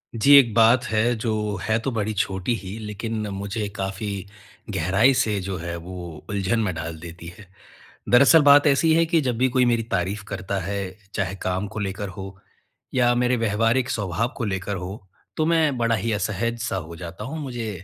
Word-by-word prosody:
जी, 140 +6 +5
एक 120 -6 +5
बात 115 +2 +5
है 115 0 +1
जो 110 0 -2 0.3
है 110 0 +1
तो 130 +3 -3
बड़ी 110 -2 -2
छोटी 95 +2 -1
ही, 100 -1 -7
लेकिन 110 +1 -4
मुझे 100 +2 -3
काफ़ी 95 0 -4 0.5
गहराई 100 +11 +3
से 105 -4 +1
जो 95 +1 -4
है 85 +1 -5
वो 85 -1 -8
उलझन 100 +2 0
में 105 -5 0
डाल 80 0 -5
देती 85 0 -10
है। 100 - -14 0.6
दरअसल 140 +6 +7
बात 145 +1 +7
ऐसी 150 +3 +4
है 165 +1 +4
कि 165 -1 +2
जब 125 -4 -1
भी 130 +2 +2
कोई 125 0 +3
मेरी 120 -1 +2
तारीफ़ 95 +4 -1
करता 95 0 -3
है, 95 0 -4 0.2
चाहे 95 -2 -2
काम 95 +2 -1
को 105 - -7
लेकर 100 0 -3
हो 95 -1 -8 0.6
या 120 -1 +3
मेरे 125 +1 +2
व्यावहारिक 115 +3 +1
स्वभाव 105 +2 -1
को 125 - -3
लेकर 95 0 -3
हो, 95 +2 -7 0.3
तो 155 - +2
मैं 160 -4 +2
बड़ा 115 -1 +2
ही 115 +2 -2
असहज-सा 115 +3 -2
हो 85 - -9
जाता 85 -1 -8
हूँ 155 +5 -5
मुझे 120 -6 -4
110 Hz, 190 wpm, -23 LUFS, 95-120 Hz, 0.6 s, दरअसल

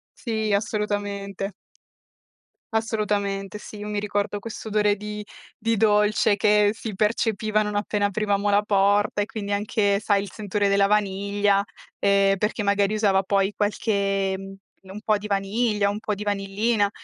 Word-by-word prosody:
Sì, 220 -3 -2
assolutamente. 205 -2 -2 1.2
Assolutamente 210 -3 -1
sì, 210 - -10
io 205 - -6
mi 210 -1 -2
ricordo 205 0 -2
questo 225 +1 -8
odore 210 -1 +2
di 210 +1 -6 0.3
di 230 0 0
dolce 210 0 +3
che 210 0 +4
si 220 -1 -6
percepiva 215 0 +1
non 210 0 -3
appena 205 0 0
aprivamo 205 0 0
la 205 +1 +4
porta 205 0 +2
e - - -3
quindi 205 -2 -5
anche 200 0 +1
sai 205 - +1
anche 200 - 0
il - - -20
sentore 205 -1 -1
della 200 0 +4
vaniglia, 200 0 +1 0.4
ehm, 200 0 +3
perché 210 +3 -1
magari 200 +1 +2
usava 200 -3 +3
poi 195 +1 +1
qualche 200 -2 0
mhmm, 195 0 -9 0.4
un 210 - -7
po' 215 -1 +2
di 210 - -7
vaniglia 205 +1 +1
un 205 +1 -3
po' 215 -1 -2
di 205 +1 -6
vanillina 205 +1 0
205 Hz, 155 wpm, -24 LUFS, 200-210 Hz, 1.2 s, che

